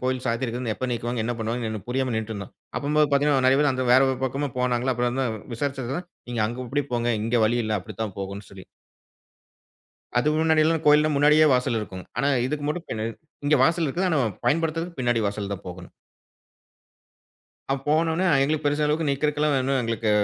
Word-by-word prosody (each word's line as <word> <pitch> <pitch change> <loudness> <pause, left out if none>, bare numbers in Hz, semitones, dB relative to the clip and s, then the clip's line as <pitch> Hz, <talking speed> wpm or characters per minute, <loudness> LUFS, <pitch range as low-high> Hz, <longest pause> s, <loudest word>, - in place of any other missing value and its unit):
கோவில் 130 0 -1
சாத்தி 115 +1 0
இருக்குது. 120 -1 -3
எப்ப 130 - -3
நீக்குவாங்க 120 0 -2
என்ன 120 - -1
பண்ணுவாங்கன்னு 110 -1 -3
புரியாம 130 0 -1
நின்னுட்டு 110 0 -3
இருந்தோம். 100 -2 -7 0.2
அப்பம்போது 150 +1 +2
பார்த்தீங்கன்னா, 140 -2 +3
நிறைய 135 +2 +5
பேரு 145 -2 +3
அந்த 130 0 -2
வேற 130 - +7
ஒரு 130 -1 -1
பக்கமும் 135 +1 -2
போனாங்களா, 125 +1 +1
அப்புறம் 120 0 0
வந்து 135 +1 0 0.3
விசாரிச்சதுல, 135 +3 -3 0.3
நீங்க 120 -2 -1
அங்க 120 +3 -5
இப்பிடி 140 +3 -1
போங்க, 120 0 0
இங்கு 115 +1 +1
வழி 120 +2 +1
இல்ல, 110 0 -1
அப்பிடி 100 +2 -10
தான் 105 -4 -5
போகணும்னு 100 +1 -6
சொல்லி 95 -2 -12 1.5
அது 135 - +2
முன்னாடி 160 -1 +3
எல்லாம் 160 0 +1
கோவில்லாம் 150 +1 +5
முன்னாடியே 150 +2 +5
வாசல் 125 -2 +1
இருக்குங்க. 95 -3 -7
ஆனா, 140 - +2 0.2
இதுக்கு 145 +1 -3
மட்டும் 170 +3 -3
பின்ன 110 0 -3 0.4
இங்க 150 0 +4
வாசல் 165 +2 +2
இருக்குது. 180 +7 0
ஆனா, 155 - +2 0.3
பயன்படுத்துறதுக்கு 165 +2 0
பின்னாடி 120 -2 +1
வாசல் 100 0 -3
தான் 100 -1 -7
போகணும். 90 0 -10 1.8
அ, - - +1 0.2
போனவுனே 160 +4 +2 0.2
எங்களுக்கு 150 +2 0
பெரிசா 145 +1 +1
அளவுக்கு 150 0 0
நிக்குறக்குல்லாம் 150 +1 +1
ஒன்னும் 135 0 +1
எங்களுக்கு 115 -1 -1
130 Hz, 180 wpm, -24 LUFS, 115-150 Hz, 1.8 s, வேற